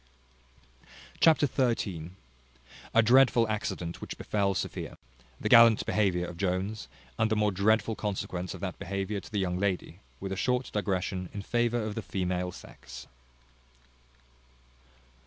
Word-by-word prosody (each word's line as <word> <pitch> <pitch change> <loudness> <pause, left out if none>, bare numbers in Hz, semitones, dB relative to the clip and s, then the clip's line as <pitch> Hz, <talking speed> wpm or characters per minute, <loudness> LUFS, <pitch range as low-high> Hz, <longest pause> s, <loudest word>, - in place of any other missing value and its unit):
Chapter 160 -2 +5 0.3
xiii. 85 -5 -5 0.8
A 115 - +5
dreadful 120 -1 +5
accident 100 -5 -3
which - - -7
befel 100 -2 0
Sophia. - - -4 0.4
The - - -2
gallant 115 -2 +7
behaviour 95 -4 +1
of 85 -1 -8
Jones, 95 +3 -2 0.3
and 110 - +3
the 110 - +1
more 105 -1 +2
dreadful 110 +3 +2
consequence 95 -3 -4
of 90 - -11
that 90 -3 -4
behaviour 100 +2 -3
to - - -13
the 105 - -2
young 90 -2 -1
lady; 95 -3 -2 0.2
with 95 0 -5
a - - -1
short 125 +5 0
digression 95 -2 -2
in 100 - -4
favour 120 +1 0
of 110 -1 -3
the 115 - -4
female 90 -2 -2
sex. - - -11
100 Hz, 140 wpm, -29 LUFS, 90-110 Hz, 0.8 s, gallant